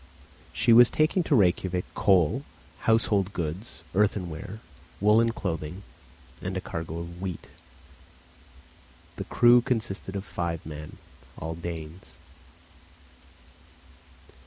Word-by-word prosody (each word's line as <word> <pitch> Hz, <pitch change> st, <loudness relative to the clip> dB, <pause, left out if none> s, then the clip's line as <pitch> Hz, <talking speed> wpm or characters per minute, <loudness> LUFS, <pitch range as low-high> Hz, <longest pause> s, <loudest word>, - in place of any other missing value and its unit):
She 115 Hz, -, +3 dB
was 120 Hz, +1 st, +9 dB
taking 155 Hz, +4 st, +2 dB
to 145 Hz, -, +3 dB
Rejkiavik 90 Hz, -3 st, +2 dB
coal, 90 Hz, -6 st, +3 dB, 0.5 s
household 105 Hz, -3 st, +2 dB
goods, 85 Hz, +5 st, -5 dB
earthenware, 95 Hz, 0 st, -1 dB, 0.4 s
woollen 110 Hz, +3 st, +4 dB
clothing, 90 Hz, -4 st, -4 dB, 0.6 s
and -, -, -3 dB
a -, -, 0 dB
cargo 80 Hz, 0 st, -5 dB
of 85 Hz, +1 st, -7 dB
wheat. 95 Hz, -3 st, -5 dB, 1.7 s
The -, -, -4 dB
crew 120 Hz, 0 st, +5 dB
consisted 110 Hz, -6 st, -3 dB
of 100 Hz, 0 st, -4 dB
five 85 Hz, -2 st, -4 dB
men, 75 Hz, 0 st, -8 dB, 0.4 s
all 80 Hz, +1 st, -4 dB
Danes. 85 Hz, 0 st, -8 dB
95 Hz, 100 wpm, -27 LUFS, 85-110 Hz, 1.7 s, was